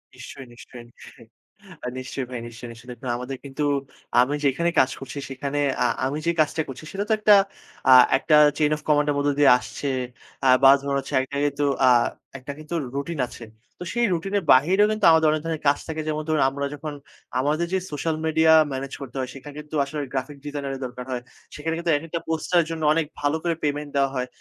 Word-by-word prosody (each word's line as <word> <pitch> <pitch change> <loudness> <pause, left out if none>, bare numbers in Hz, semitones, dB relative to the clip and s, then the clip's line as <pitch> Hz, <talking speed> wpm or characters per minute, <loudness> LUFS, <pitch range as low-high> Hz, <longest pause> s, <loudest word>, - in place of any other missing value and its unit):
নিশ্চয়ই, 130 +1 -10
নিশ্চয়ই, 120 0 -12
নিশ্চয়ই। - - -16 0.5
অ্যাঁ 125 - -5
নিশ্চয়ই 130 +1 -5
ভাই 125 -2 -5
নিশ্চয়ই, 120 +1 -10
নিশ্চয়ই। 115 +2 -14
দেখুন 125 +2 -10
আমাদের 125 +2 -6
কিন্তু 140 +2 -4 0.6
আমি 140 +4 +1
যেখানে 170 +6 +2
কাজ 130 0 +3
করছি 135 +1 -8
সেখানে 140 +2 -3 0.3
আ - - +4 0.2
আমি 140 +3 -2
যে - - +4
কাজটা 155 +1 0
করছি 135 +2 -9
সেটা 200 +1 -3
তো - - +4
একটা 210 0 +6 0.6
আ - - +10 0.2
একটা 155 +2 +2 0.2
chain 150 -1 +2
of - - -14
command 150 -1 +3
এর - - -2
মধ্য 145 0 +1
দিয়ে 145 -3 +7
আসছে 140 - -5 0.6
আ - - +5
বা 135 - +9
ধরুন 140 0 -2
হচ্ছে 135 - -8
একটা 140 +2 -5
কিন্তু 145 0 -1 0.2
আ - - +7 0.5
একটা 130 +2 -7
কিন্তু 155 +2 -9 0.2
রুটিন 140 +2 -4
আছে। 115 - -10 0.3
তো - - -5
সেই 240 0 +2
রুটিনের 195 +4 -1
বাহিরেও 185 +11 +4
কিন্তু 215 -1 0
আমাদের 160 -1 +4
অনেক 155 -1 -1
ধরনের 160 -2 -3
কাজ 145 - +4
থাকে; 160 0 -4
যেমন 155 0 -2
ধরুন 155 -1 +1
আমরা 140 +1 -4
যখন 150 +1 -6 0.5
আমাদের 150 +5 +1
যে 190 - +2
social 155 +2 -2
media 160 0 +4 0.2
manage 135 +1 -5
করতে 130 -1 -9
হয়, 130 - -3
সেখানে 140 +2 -10
কিন্তু 150 +1 -8
আসলে 150 +2 -6
graphic 135 +2 -4
designer 145 -2 -4
এর 135 - -9
দরকার 125 0 -7
হয়। 125 -1 -3 0.3
সেখানে 160 +2 -3
কিন্তু 170 0 0
এক-একটা 165 +3 -5
poster 165 +2 0
এর 165 - -3
জন্য 160 -1 -4
অনেক 165 -1 +1 0.2
ভালো 145 +2 +1
করে 170 - +1
payment 145 0 -2
দেওয়া 135 -1 +2
হয়। 125 0 -2
145 Hz, 210 wpm, -24 LUFS, 135-160 Hz, 0.6 s, আ